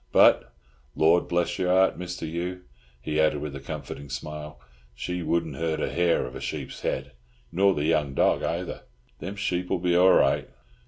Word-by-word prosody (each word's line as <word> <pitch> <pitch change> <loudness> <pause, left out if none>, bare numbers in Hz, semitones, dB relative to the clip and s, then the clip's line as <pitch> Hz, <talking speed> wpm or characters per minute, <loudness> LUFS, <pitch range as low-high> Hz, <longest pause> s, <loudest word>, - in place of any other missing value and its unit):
But, - - +5 0.4
Lord 85 +3 +4
bless 85 -1 0
your 90 - +1
heart, 95 +1 +4
Mr. 90 -2 -5
Hugh," 90 +3 -4 0.4
he 75 +5 -2
added 75 -1 +3
with 75 -1 -5
a - - -5
comforting 70 0 -7
smile, 75 +3 -6 0.4
"she 90 +7 -3
wouldn't 80 -4 -1
hurt 80 -1 -1
a 65 - -1
hair 85 +1 +2
of 65 - -8
a - - -7
sheep's - - -5
head, - - -2 0.4
nor 100 +2 +3
the 75 - -1
young 75 -4 +1
dog - - +3
ayther. 85 +1 -3 0.4
Them 95 +3 -5
sheep'll 90 -3 -1
be 90 0 +1
all 90 +1 +6
right. - - +3
85 Hz, 175 wpm, -26 LUFS, 75-90 Hz, 0.4 s, all